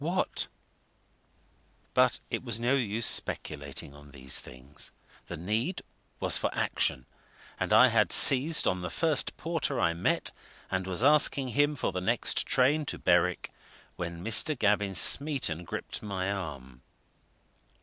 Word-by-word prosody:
what 180 +4 -2 1.5
But - - +2
it - - -3
was 115 -3 -3
no 120 +3 0
use 115 -4 -1
speculating 70 - -1
on 75 0 -16
these 65 -2 -1
things 65 +4 -9 0.4
the - - -7
need 110 - -3 0.4
was - - +3
for - - -1
action. 65 - -1 0.5
And - - -3
I 120 +4 +6
had 105 -6 +1
seized 145 +4 +6
on 90 0 -1
the 90 - -5
first 160 - +1
porter 165 -2 -3
I 85 - +1
met, 85 - -1 0.4
and 95 0 -3
was 95 +5 -2
asking 140 -2 +3
him 145 +5 0
for 130 - -3
the 90 0 -5
next 115 +5 -1
train 135 +5 +2
to - - -3
Berwick, 90 0 0 0.4
when 85 -1 -7
Mr. 120 +7 +3
Gavin 105 -3 0
Smeaton 125 - +3
gripped - - -7
my 100 -2 -4
arm. 70 -10 -8
105 Hz, 140 wpm, -28 LUFS, 85-135 Hz, 1.5 s, I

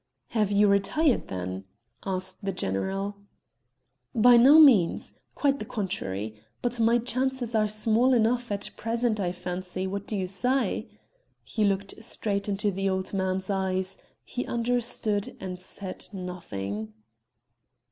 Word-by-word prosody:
"Have 215 -4 +1
you 205 +1 +5
retired 200 +9 +2
then?" 95 +1 -5 0.4
asked 185 +1 -2
the 195 - -1
general. 195 - -2 1.0
"By 240 +2 +7
no 265 +6 +8
means 230 - +5 0.2
quite 280 -1 +1
the 215 - -5
contrary; 110 - -4 0.2
but 240 -1 0
my 230 +1 +4
chances 255 0 -1
are 215 -1 +3
small 220 +4 +2
enough 240 +1 +1
at 200 0 -3
present 230 -1 0
I 180 -3 0
fancy; 180 +1 -4
what 200 +1 -4
do 210 - -2
you 190 - -1
say?" 250 +9 0 0.5
He 220 - -2
looked 195 -1 0
straight 200 -2 -1
into 205 +1 0
the 195 +1 -1
old 190 0 -2
man's 190 0 -1
eyes; 190 0 -1 0.2
he 250 - -4
understood 235 -3 -1
and 180 -1 -6
said 185 0 -7
nothing. 110 - -5
200 Hz, 135 wpm, -27 LUFS, 185-230 Hz, 1.0 s, no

